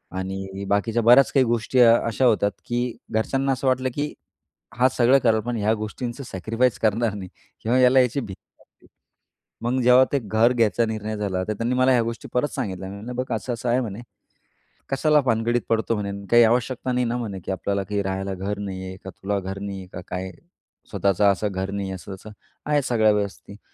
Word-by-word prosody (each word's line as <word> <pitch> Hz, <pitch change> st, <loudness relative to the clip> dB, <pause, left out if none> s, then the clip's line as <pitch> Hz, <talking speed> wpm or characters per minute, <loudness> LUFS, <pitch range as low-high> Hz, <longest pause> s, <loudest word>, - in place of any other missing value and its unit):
आणि 95 Hz, +1 st, -5 dB
बाकीच्या 110 Hz, +3 st, +1 dB
बऱ्याच 125 Hz, +4 st, +6 dB
काही 135 Hz, -2 st, +4 dB
गोष्टी 120 Hz, +2 st, 0 dB
अ, 115 Hz, -2 st, +8 dB
अशा 115 Hz, +3 st, +1 dB
होतात 105 Hz, -4 st, +3 dB
की 120 Hz, 0 st, -2 dB, 0.2 s
घरच्यांना 135 Hz, +5 st, 0 dB
असं 130 Hz, +1 st, -3 dB
वाटलं 130 Hz, 0 st, +1 dB
की 150 Hz, +1 st, -2 dB, 0.7 s
हां, 130 Hz, -, +6 dB
सगळं 125 Hz, +3 st, +5 dB
करेल, 110 Hz, -3 st, +2 dB
पण 120 Hz, +2 st, -3 dB
ह्या 105 Hz, +1 st, +1 dB
गोष्टींचं 120 Hz, +4 st, -5 dB
सॅक्रिफाईस 115 Hz, +4 st, -1 dB
करणार 110 Hz, 0 st, +1 dB
नाही 95 Hz, -2 st, -7 dB, 0.3 s
किंवा 120 Hz, +3 st, +1 dB
याला 130 Hz, +1 st, +6 dB
याची 125 Hz, +2 st, 0 dB
भीती 100 Hz, -6 st, -14 dB, 0.8 s
मग 125 Hz, +2 st, 0 dB
जेव्हा 125 Hz, +2 st, +6 dB
ते 140 Hz, -, +3 dB
घर 115 Hz, +2 st, +2 dB
घ्यायचा 115 Hz, 0 st, +2 dB
निर्णय 110 Hz, -1 st, -4 dB
झाला, 95 Hz, -3 st, -2 dB
तर 110 Hz, -, -1 dB
त्यांनी 115 Hz, +4 st, -1 dB
मला 130 Hz, +1 st, +3 dB
ह्या 125 Hz, -2 st, +4 dB
गोष्टी 115 Hz, 0 st, -5 dB
परत 125 Hz, +4 st, +1 dB
सांगितल्या. 95 Hz, -7 st, -4 dB
"म -, -, -8 dB
म्हणलं, 115 Hz, +5 st, -7 dB
बघ 125 Hz, -, -2 dB
असं 120 Hz, +2 st, -3 dB
असं 120 Hz, +1 st, -3 dB
आहे 120 Hz, +2 st, +3 dB
म्हणे, 110 Hz, -1 st, -5 dB, 0.9 s
कशाला 150 Hz, +2 st, +3 dB
भानगडीत 120 Hz, -1 st, +1 dB
पडतो 115 Hz, 0 st, +1 dB
म्हणे? 100 Hz, -1 st, -3 dB, 0.2 s
काही 120 Hz, 0 st, +7 dB
आवश्यकता 125 Hz, +2 st, +1 dB
नाही 125 Hz, 0 st, +1 dB
ना 120 Hz, +1 st, -1 dB
म्हणे 105 Hz, -6 st, -5 dB
की -, -, -3 dB
आपल्याला 100 Hz, +2 st, -2 dB
काही 100 Hz, +1 st, -2 dB
राहायला 95 Hz, 0 st, -3 dB
घर 100 Hz, +2 st, -4 dB
नाही 95 Hz, -2 st, -5 dB
आहे 95 Hz, -, -7 dB
का, 95 Hz, -, -7 dB
तुला 100 Hz, +2 st, -3 dB
घर 95 Hz, +1 st, -6 dB
नाही 100 Hz, -1 st, -5 dB
आहे 95 Hz, -, -10 dB
का, -, -, -6 dB
काय 95 Hz, +1 st, -5 dB, 0.6 s
स्वतःचं 100 Hz, 0 st, +1 dB
असं 105 Hz, +2 st, -1 dB
घर 95 Hz, +1 st, -3 dB
नाही 100 Hz, -1 st, -3 dB
आहे? 95 Hz, -, -4 dB
असं 95 Hz, +2 st, -9 dB
असं 110 Hz, -, -12 dB, 0.4 s
आहे 150 Hz, -1 st, +2 dB
सगळ्या 110 Hz, -4 st, +3 dB
व्यवस्थित, 100 Hz, -1 st, -3 dB
ते 105 Hz, -, -18 dB
115 Hz, 205 wpm, -23 LUFS, 100-125 Hz, 0.9 s, अ